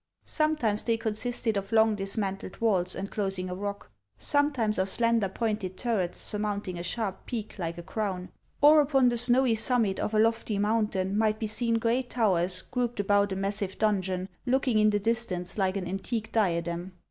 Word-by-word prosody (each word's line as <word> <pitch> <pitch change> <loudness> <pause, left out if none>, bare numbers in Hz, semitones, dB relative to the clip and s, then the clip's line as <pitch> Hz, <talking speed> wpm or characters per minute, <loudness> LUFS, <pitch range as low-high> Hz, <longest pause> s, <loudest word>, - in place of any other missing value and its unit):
Sometimes 300 -9 +1
they 230 -1 0
consisted 225 0 -2
of 195 +1 -4
long 220 -1 +4
dismantled 195 -1 -3
walls, 185 -5 +1
enclosing 195 -2 -3
a - - -2
rock, 200 - -5 0.3
sometimes 250 - +1
of 190 - +1
slen 230 +3 +2
der 195 -3 -1
pointed 210 -3 -3
turrets, 215 -8 -1
surmounting 205 -4 -2
a - - -3
sharp 195 +2 -4
peak, 220 -3 -4
like 170 -1 -3
a 170 - -7
crown; 190 -1 -3 0.3
or 300 +1 +8
upon 270 -3 +3
the 240 - -1
snowy 245 +1 +5
summit 220 -3 +1
of 215 - -2
a - - +4
lofty 225 -1 +1
mountain 205 -2 0
might 215 0 +2
be 220 - -3
seen 230 +2 0
great 235 +2 0
towers 185 -6 +1
grouped 245 -3 -3
about 205 0 +2
a - - -1
massive 195 0 -2
don 210 -3 +2
jon, 185 0 -3 0.2
looking 255 -3 +2
in 215 0 +5
the 205 - +2
distance 205 -5 -1
like 190 0 +1
an 185 -2 -4
antique 210 +4 -4
diadem. 175 -3 -1
210 Hz, 180 wpm, -28 LUFS, 190-230 Hz, 0.3 s, or